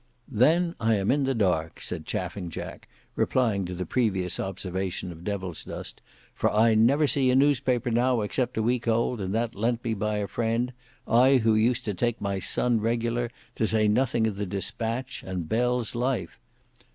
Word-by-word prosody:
"Then 165 +9 +3
I 115 -1 +2
am 100 0 +1
in 140 0 +2
the 135 0 0
dark," 90 -7 0
said - - -5
Chaffing 90 -4 -3
Jack, - - -8 0.3
replying 110 -7 +1
to 90 0 -5
the 90 +1 -3
previous 95 -4 0
observation 95 -1 -3
of 85 0 -11
Devilsdust, 95 -4 -5 0.3
"for - - 0
I 110 +2 +4
never 125 +8 +4
see 135 -2 +2
a 125 - +3
newspaper 130 -3 +2
now 120 0 +2
except 120 +4 -2
a 110 - +1
week 120 +1 0
old, 115 0 +1
and 95 -1 -3
that 115 0 -1
lent 115 +3 -1 0.2
by 105 0 0
a 100 -1 -2
friend, 115 +4 -1 0.3
I 130 +4 +5
who 115 -2 +3
used 120 +3 +2
to 105 - -1
take 120 +5 -1
my 100 -1 -2
Sun 115 +5 +1
regular, 120 +1 0 0.2
to 110 - 0
say 110 -1 +3
nothing 115 +1 +2
of 105 -3 -2
the 100 -1 -3
Dispatch, 115 +7 -2
and 90 -4 -4
Bell's 125 +2 0
Life. 125 +1 -2
115 Hz, 175 wpm, -26 LUFS, 100-125 Hz, 0.3 s, I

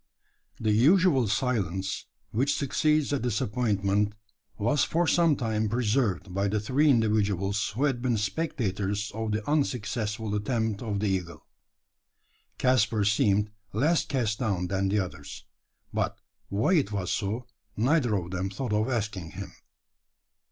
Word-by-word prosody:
The 110 -1 +1
usual 140 - +4
silence 95 -5 -1 0.2
which 130 +6 +1
succeeds 150 +1 +1
a 140 - +1
disappointment 105 -3 0 0.4
was 120 +7 +2
for 170 +2 +1
some 165 -2 +4
time 110 -3 -1
preserved 110 -5 0
by 100 +2 +1
the 105 +2 0
three 135 +8 +2
individuals 105 -4 +2
who 130 - 0
had 135 -5 +1
been 120 -2 +1
spectators 105 - -2
of 110 0 -3
the 105 +1 -2
unsuccessful 110 -6 -1
attempt 110 0 -1
of 105 -4 -2
the - - 0
eagle. 90 -3 -3 1.1
Caspar 115 -4 +2
seemed 105 0 +2 0.2
less 155 +9 +2
cast 115 -6 -1
down 95 -7 -1
than 95 +1 0
the 105 - +1
others; 80 -8 -5 0.5
but - - -1 0.3
why 110 - +1
it 145 - +2
was 95 -3 -2
so, 110 +5 -2 0.3
neither 125 -1 +2
of 90 -2 -3
them 95 +1 -2
thought 105 +3 -3
of 110 +4 +1
asking 105 -9 -3
him. - - -7
110 Hz, 135 wpm, -27 LUFS, 100-125 Hz, 1.1 s, usual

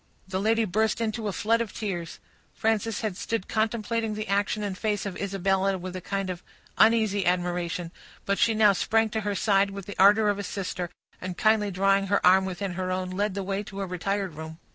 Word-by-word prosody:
The 190 0 -2
lady 225 +2 +2
burst 215 +3 +1
into 225 -1 -2
a - - 0
flood 230 +4 +1
of 230 - -5
tears. 175 -6 -4 0.4
Frances 220 0 0
had 215 -5 -2
stood 225 +1 -3
contemplating 225 0 -1
the 215 0 -4
action 205 +2 0
and 200 -2 -3
face 210 0 -1
of 195 -2 -4
Isabella 195 0 0
with 185 0 -7
a 185 - -5
kind 195 0 -2
of 175 -1 -7 0.3
uneasy 220 -3 +4
admiration, 175 -1 -1 0.3
but 200 0 0
she 230 -1 +3
now 210 -2 +6
sprang 225 +4 +1
to 220 +1 -2
her 205 -1 -2
side 200 0 +3
with 195 -1 -7
the 205 - -7
ardor 210 +2 +6
of 205 0 0
a - - -3
sister, 180 -2 -4 0.3
and 185 -1 -5
kindly 215 -1 +3
drawing 195 +1 +2
her 200 +1 +2
arm 190 +1 +6
within 190 0 -4
her 185 +1 -3
own, 185 0 -2
led 200 +1 -1
the 200 - -2
way 195 +1 -2
to 200 -1 -7
a - - -1
retired 190 +1 -2
room. 160 +1 -8
200 Hz, 210 wpm, -26 LUFS, 185-215 Hz, 0.4 s, now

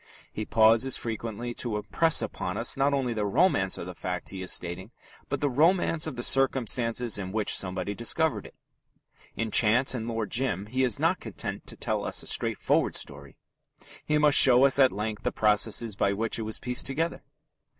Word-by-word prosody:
He 110 - -5
pauses 115 +4 +3
frequently 115 +1 -5
to 120 -2 -4
impress 160 +9 +2
upon - - -5
us - - -2
not 135 +1 +1
only 135 -4 -1
the 110 -2 -3
romance 100 - +1
of - - -7
the 90 - -8
fact 90 0 -5
he 95 -1 -7
is 90 - -1
stating 90 +3 -2 0.4
but - - -3
the 145 - +1
romance 160 +3 +2
of 155 - -6
the 120 - -4
circumstances 120 -4 +2
in 95 -1 -6
which 110 0 -1
somebody 95 +1 -3
discovered 150 +8 -1
it. - - -19 0.8
In 115 -1 -3
Chance 120 +6 +3
and 115 -3 -5
Lord 115 -3 -4
Jim 115 -6 -1
he 130 +5 -2
is 125 -5 +2
not - - 0
content - - -6
to - - -5
tell - - -2
us - - +1
a - - -13
straightforward - - 0
story: 70 -1 -7 0.7
he 150 - 0
must 150 -1 +4
show 130 0 +6
us 140 0 +4
at 130 -2 +5
length 105 +1 -5
the - - -2
processes 110 +1 +1
by 100 0 0
which 115 +3 -2
it 110 -1 -4
was 110 - -4
pieced 125 0 -2
together. 160 +5 -2
115 Hz, 190 wpm, -26 LUFS, 105-135 Hz, 0.8 s, show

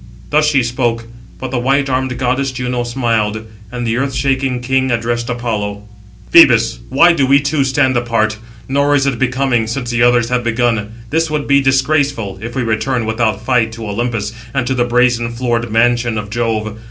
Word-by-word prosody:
Thus 150 +1 +3
she 140 -4 +2
spoke; 120 -1 -1 0.3
but 130 -1 -5
the 130 - -1
white 135 +3 +1
armed 130 -1 -1
goddess 130 +2 -1
Juno 125 -1 -3
smiled. 115 -3 -1 0.3
And 120 -1 -4
the 115 0 -1
earth 135 0 -2
shaking 135 -2 0
king 130 +1 0
addressed 120 0 -1
Apollo: 105 -4 -3 0.5
"Phoebus, 115 -8 +6
why 170 +7 +5
do 140 -5 +1
we 140 +1 +5
two 140 0 0
stand 130 0 +1
apart? 115 -3 0 0.3
Nor 140 +2 +2
is 140 -1 +2
it 135 -4 -1
becoming, 125 -3 0
since 120 +1 -3
the 120 -1 0
others 120 -1 +3
have 125 0 0
begun. 115 -2 0 0.2
This 160 +1 +1
would 150 -1 -2
be 140 0 +3
disgraceful, 135 -6 0
if 115 +3 -7
we 130 - -1
return 115 +2 -1
without 110 -1 -1
fight 115 -3 +1
to 115 -1 -7
Olympus, 110 0 -3 0.2
and 130 -3 0
to 130 - -1
the 120 -2 +1
brazen 120 -1 +1
floored 120 -2 -2
mansion 120 0 +1
of 105 -1 -5
Jove. 110 -2 -2
120 Hz, 185 wpm, -16 LUFS, 115-135 Hz, 0.5 s, Phoebus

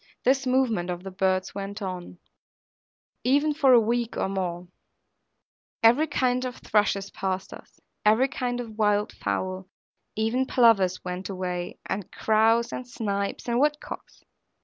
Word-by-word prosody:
This 265 +1 +2
movement 240 -9 +1
of 175 0 -4
the 190 - -7
birds 185 0 0
went 200 +1 -5
on, 185 -3 -6 1.1
even 290 +4 +3
for 285 -3 +4
a 245 - +8
week 235 +1 -1
or - - 0
more; 180 -2 -3 1.2
every 245 +8 +5
kind 255 -3 +1
of 255 -1 -4
thrushes 200 -2 0
passed 190 0 -3
us, - - -14 0.2
every 220 +5 +4
kind 250 -2 -3
of 225 -3 -7
wild 210 0 +2
fowl, 185 0 -3 0.5
even 225 +4 0
plovers 205 -8 +4
went 180 +2 -4
away, 180 -2 -4
and 195 -2 -4
crows, 225 +2 +2
and 250 - -5
snipes 200 -4 -3
and 240 0 +1
wood 295 +1 +2
cocks. - - -10
215 Hz, 145 wpm, -26 LUFS, 190-245 Hz, 1.2 s, a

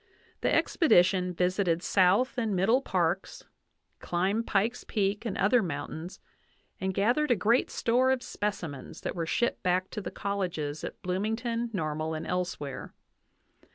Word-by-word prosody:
The - - +1
expedition 180 - +3
visited 180 -1 +1
South 195 +9 +3
and 220 -4 0
Middle 225 +8 +3
Parks, 185 -4 -1 0.6
climbed 195 +6 -1
Pikes 220 +5 0
Peak 205 +1 -1
and 200 - -3
other 220 +5 +4
mountains, 160 +1 -5 0.6
and 190 0 -1
gathered 240 +10 +2
a 245 - +5
great 225 +5 +2
store 250 +3 +2
of 260 -1 +1
specimens 170 -10 -4
that - - -3
were 165 -2 -3
shipped 240 - 0
back 185 0 0
to 210 - -4
the - - -5
colleges 175 -7 -3
at - - -6
Bloomington, 225 +5 -1
Normal, 155 -4 -2
and 155 - -5
elsewhere. 175 -7 -4
190 Hz, 140 wpm, -29 LUFS, 175-225 Hz, 0.6 s, a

